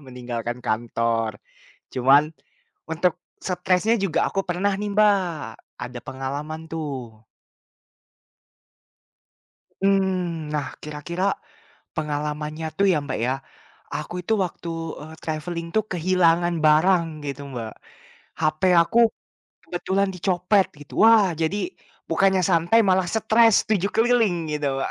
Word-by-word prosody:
meninggalkan 120 -1 -5
kantor. 115 -1 -1 0.5
Cuman, 140 +5 +4 0.6
untuk 170 +1 +1 0.3
stresnya 185 +4 +1
juga 190 -6 +1
aku 195 - -1
pernah 185 +3 0
nih 210 0 -2
Mbak, 210 -1 +6 0.7
ada 125 0 -6
pengalaman 140 +4 -5
tuh. 130 -9 -6 2.5
Mhm, 185 -5 0
nah 145 -3 -1 0.2
kira-kira, 155 +5 -4 0.7
pengalamannya 150 +1 -3
tuh 200 - +4
ya, 155 - +2
Mbak, 135 - -3
ya, 130 - +1 0.6
aku 150 +4 -5
itu 220 - +1
waktu, 175 -1 -7 0.3
eee, 155 +1 -10
traveling 165 +2 -4
tuh 215 - +3
kehilangan 175 -1 +2
barang 170 +3 +5 0.2
gitu 140 0 -5
Mbak. 115 -3 -5 0.7
HP 155 +2 0 0.2
aku 170 +8 -1 0.7
kebetulan 190 +2 -1
dicopet 185 +2 +2
gitu. 145 - -12
Wah 215 -5 +6
jadi 160 +6 0 0.5
bukannya 190 -1 +3
santai 170 +6 +4
malah 185 -1 +3
stres 220 0 +4
7 200 -2 +1
keliling 225 -5 +3 0.2
gitu, 150 -1 -2 0.2
Mbak, - - -2
165 Hz, 110 wpm, -23 LUFS, 145-190 Hz, 2.5 s, Mbak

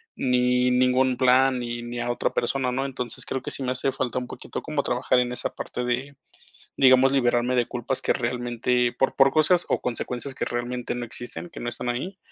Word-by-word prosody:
ni 125 0 +2
ningún 125 0 +3
plan, 130 +1 +4
ni 120 -1 -4
ni 120 0 -6
a 120 0 -1
otra - - 0
persona, 130 +1 0
¿no? 135 +2 -1
Entonces 125 -3 -5
creo 130 - -3
que - - -6
sí 135 - -3
me 125 - -1
hace 130 +1 0
falta 130 -1 -2
un 125 - -6
poquito - - -7
como 150 -3 -2
trabajar 125 +1 +1
en 125 0 0
esa - - -3
parte 125 - -4
de 130 +4 -2 0.6
digamos, 130 0 +6
liberarme 125 -1 +2
de 120 - +3
culpas 125 +2 -3
que - - +2
realmente 120 0 0
por 135 - +2
por 135 0 +6
cosas 160 +4 +3
o - - 0
consecuencias 125 +2 -3
que - - -3
realmente 120 0 -3
no 120 - -4
existen, 120 +8 -6
que - - -10
no 120 - -5
están 120 +1 -3
ahí. 175 +11 -3
125 Hz, 210 wpm, -25 LUFS, 120-130 Hz, 0.6 s, digamos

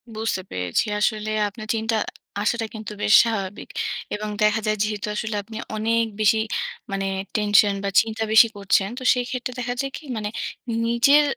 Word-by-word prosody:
বুঝতে 220 -3 -1
পেরেছি। 90 - 0
আসলে 215 0 0 0.2
আপনার 215 +2 -9
চিন্তা 225 0 0
আ - - -18 0.3
আসাটা 230 +1 0
কিন্তু 215 -1 -6
বেশ 205 - +4
স্বাভাবিক 205 -4 -3 0.5
এবং 210 0 -4
দেখা 210 +1 +3
যায় 215 0 +1
যেহেতু 210 -1 -3
আসলে 220 0 -2
আপনি 220 +2 -9 0.2
অনেক 230 +2 +1 0.2
বেশি 215 +1 +4 0.5
মানে 195 0 -1 0.3
টেনশন 205 -1 +4
বা, 200 - 0
চিন্তা 225 0 -3
বেশি 220 +1 +8
করছেন, 195 0 +2
তো - - -8
সেইক্ষেত্রে 250 0 -3
দেখা 245 0 -2
যায় 275 - -4
কি? - - -13
মানে 210 -1 -2 0.6
নিজের 275 +6 +5
215 Hz, 165 wpm, -23 LUFS, 210-230 Hz, 0.6 s, বেশি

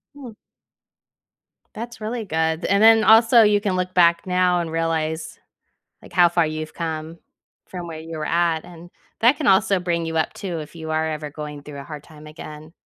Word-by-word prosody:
Hmm. 260 -5 -10 1.4
That's 235 +1 -8
really 225 +2 -4
good. 160 -1 -1
And 200 +1 +2
then 225 0 +7
also 225 +2 +6
you 210 -1 +4
can 200 -2 -2
look 185 0 -2
back 170 -1 +3
now 180 -1 +2
and 170 -2 -4
realize, 160 -1 -2 0.6
like, - - -15
how 175 -2 +5
far 170 -1 +1
you've 155 0 -6
come 160 0 -5 0.5
from 180 -2 -7
where 160 -1 -7
you 160 0 -8
were 155 - -3
at. 165 -1 0
And 175 0 -13 0.3
that 240 +5 +5
can 300 - -2
also 195 0 +3
bring 170 -1 -1
you 160 0 -4
up 160 - 0
too 180 -4 -5
if 150 +2 -11
you 160 -1 -7
are 160 0 0
ever 150 -1 -5
going 150 -1 -8
through 145 -1 -10
a - - -9
hard 150 -2 -9
time 155 -1 -15
again 155 0 -11
170 Hz, 195 wpm, -22 LUFS, 155-190 Hz, 1.4 s, then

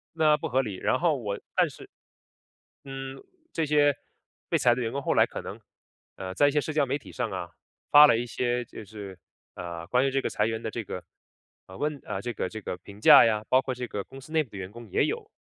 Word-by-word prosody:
那 155 -2 +4
不 - - -4
合 130 -2 +2
理， 105 -7 -5
然 130 - +1
后 160 -4 +2
我， 105 -5 -4 0.2
但 - - +4
是 - - -13 0.9
嗯， 135 -1 -7 0.3
这 165 - -1
些 145 -1 +3 0.5
被 - - +2
裁 120 -1 +4
的 125 - -3
员 115 -1 -2
工， 140 - -3
后 - - 0
来 - - +6
可 - - -7
能， - - -8 0.6
呃， 95 -1 -6
在 145 +9 +4
一 145 - +3
些 150 - +2
社 155 - -4
交 150 -2 +2
媒 135 +2 -1
体 - - -13
上 125 -2 -2
啊， 90 -2 -5 0.4
发 150 +1 +10
了 145 - +5
一 120 - -2
些 120 +1 -1
就 110 - -10
是， 100 -2 -9 0.4
呃， 85 -1 -6
关 125 +2 +2
于 135 - +1
这 135 +1 +1
个 - - -2
裁 105 - 0
员 110 0 -2
的 110 - -3
这 115 +1 -4
个， 90 -2 -6 0.6
啊 95 - -13
问 150 +6 -2
啊， - - -4
这 120 - -3
个 100 - -2
这 110 - -7
个 90 - -5
评 100 +3 -14
价 - - +9
呀， 110 -2 +1
包 130 - +5
括 130 0 -3
这 125 0 -5
个 100 -2 -4
公 135 +7 -12
司 155 - -14
内 160 -1 +3
部 125 - -20
的 100 - -8
员 95 0 -6
工 120 0 -11
也 - - +3
有 - - -4
125 Hz, 270 characters per minute, -27 LUFS, 105-140 Hz, 0.9 s, 发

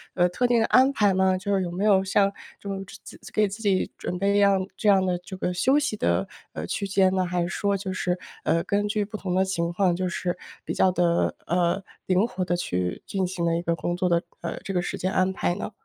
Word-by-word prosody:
呃， 175 -1 +4
特 245 +8 0
定 240 -1 +3
的 225 - +3
安 260 +2 +5
排 205 -7 +3
吗？ 190 0 +3
就 200 +2 -2
是 190 - +1
有 180 - -2
没 185 +4 -3
有 195 -2 +5
像 195 +1 +2 0.3
这 200 - -10
种 195 -1 -3 0.2
自 - - -12
给 210 -1 +2
自 200 +3 -7
己 195 -3 +1
准 180 - -4
备 200 +2 +2
样 195 -2 +4
这 210 - +2
样 190 -1 +5
的 180 -1 0
这 180 +2 -9
个 180 - -1
休 265 +11 +3
息 280 -7 -1
的， 85 - +1 0.3
呃， 80 - -4
区 200 - -2
间 190 -1 +3
呢？ 185 - +1
还 180 0 -1
是 170 - 0
说 200 +1 0
就 190 0 -4
是， 180 0 -1 0.3
呃， 165 0 +1
根 205 +1 0
据 210 0 0
不 215 +1 -7
同 185 -3 -3
的 190 - +4
情 170 -3 -1
况， 180 -2 +2
就 185 +1 -1
是 180 -1 -2 0.3
比 - - -4
较 185 - +3
地， 180 -1 +1 0.4
呃， 180 +2 +1 0.2
灵 185 +3 +3
活 185 -5 -3
地 175 - 0
去 90 - -2
进 190 -1 -1
行 180 -2 -4
了 165 0 +2
一 170 - -1
个 170 -1 0
工 175 +1 -2
作 180 - +1
的， 170 0 +3 0.2
呃， 170 - -4
这 195 - -4
个 180 - +1
时 - - -4
间 185 +1 -1
安 185 0 +1
排 175 - 0
呢？ 205 - -5
190 Hz, 275 characters per minute, -25 LUFS, 175-200 Hz, 0.4 s, 安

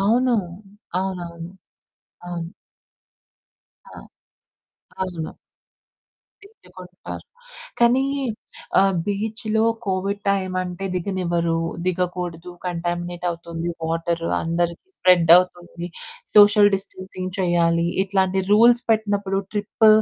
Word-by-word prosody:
అవును. 240 +5 +3 0.7
అవునవును. 175 -3 -5 0.8
అవును. 170 0 -5 1.4
ఆ! - - -10 1.1
అవును. 170 -4 -6 1.1
తిట్టుకుంటారు 185 - -11 0.5
కానీ 245 +3 +4 0.8
ఆహ్, 195 0 +3
బీచ్‌లో 220 +2 -1 0.2
కోవిడ్ 195 +2 -1
టైమంటే 185 -1 -2
దిగనివ్వరు, 175 -3 -1 0.3
దిగకూడదు. 180 -1 -2
కంటామినేట్ 175 0 -3
అవుతుంది 170 0 -5 0.2
వాటరు, 165 +1 -1
అందరికి 170 - -1
స్ప్రెడ్ 175 -3 +4
అవుతుంది, 175 -1 -1 0.5
సోషల్ 205 0 +7
డిస్టెన్సింగ్ 185 -1 -6
చేయాలి. 170 -1 +2 0.2
ఇట్లాంటి 190 -1 +1
రూల్స్ 235 +3 +6
పెట్టినప్పుడు 205 -3 +1
ట్రిప్ 210 +2 +2
185 Hz, 80 wpm, -22 LUFS, 170-200 Hz, 1.4 s, సోషల్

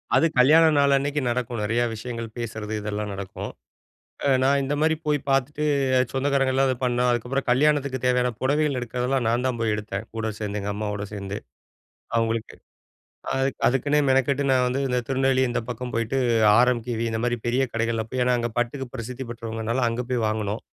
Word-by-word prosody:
அது - - +5
கல்யாண 155 +6 +7
நாள் 140 0 +4
அன்னைக்கு 145 +2 -1
நடக்கும். 120 -1 -2
நெறையா 115 +3 +1
விஷயங்கள 115 +1 -5
பேசுறது, 110 -2 -5
இதெல்லாம் 105 0 -3
நடக்கும். 95 -1 -6 0.8
அ - - +3
நான் 140 +1 +3
இந்த 135 +2 -1
மாதிரி 160 +1 +3
போய் 150 -1 +2
பார்த்துட்டு 135 +2 +1 0.5
சொந்தக்காரங்கள்லாம், 135 0 +2
அத 130 - +1
பண்ணோம். 125 0 +2
அதுக்கப்புறம் 125 +3 -1
கல்யாணத்துக்கு 140 0 +2
தேவையான 125 0 +2
புடவைகள் 145 +1 +1
எடுக்கிறதெல்லாம், 125 +1 -1
நான் 120 +2 0
தான் 125 -2 -2
போய் 115 -2 +1
எடுத்தேன். 105 0 -5
கூட 115 -1 -2
சேர்ந்து, 105 -1 -3
எங்க 100 +1 -3
அம்மாவோட 105 -1 -3
சேர்ந்து. 100 0 -5 0.8
அவங்களுக்கு. 115 -1 -1 0.8
அ - - -1 0.3
அதுக்குன்னே 145 +3 +2
மெனக்கெட்டு, 135 +1 +2
நான் 125 -1 +3
வந்து 130 +2 -1
இந்த 125 -1 +1
திருநெல்வேலி 135 -1 +2
இந்த 120 - -1
பக்கம் 125 +1 -5
போயிட்டு 115 +3 0 0.4
ஆர்எம்கேவி 120 -2 +1
இந்த 110 0 -2
மாரி 120 0 0
பெரிய 125 +3 +2
கடைகள்ல 115 0 0
போய் 130 -1 0
ஏன்னா 125 0 +3
அங்க 120 0 -2
பட்டுக்கு 125 +3 -1
பிரசித்தி 125 +3 -6
பெற்றவங்கனால 115 +1 -2
அங்க 120 +2 -3
போய் 120 -3 0
வாங்குனோம். 110 0 -2
125 Hz, 170 wpm, -24 LUFS, 115-135 Hz, 0.8 s, கல்யாண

